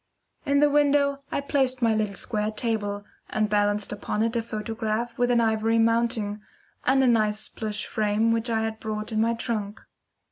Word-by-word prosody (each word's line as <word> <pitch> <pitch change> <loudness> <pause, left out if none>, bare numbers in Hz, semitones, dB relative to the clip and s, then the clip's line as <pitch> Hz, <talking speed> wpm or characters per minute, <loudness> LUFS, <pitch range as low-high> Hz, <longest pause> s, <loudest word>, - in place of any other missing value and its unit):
In 280 0 +3
the 295 - +5
window 285 -1 +3
I - - -1
placed 265 -2 0
my 225 -1 +4
little 210 -2 -1
square 215 -1 -2
table, 210 -2 -2 0.2
and 215 0 0
balanced 205 0 +1
upon 210 +1 -2
it 230 +1 -1
a 235 - +1
photograph 225 +1 -3
with 245 0 +2
an 240 -1 +3
ivory 225 0 +2
mounting 230 -2 +1 0.5
and 265 +1 +4
a - - +4
nice 215 -2 +2
plush 215 -1 -4
frame 215 +1 +1
which 230 +1 0
I 225 -1 +1
had 220 0 -3
brought 215 0 -4
in 220 0 +1
my 230 +1 +2
trunk. 215 -3 -3
225 Hz, 180 wpm, -25 LUFS, 215-235 Hz, 0.5 s, the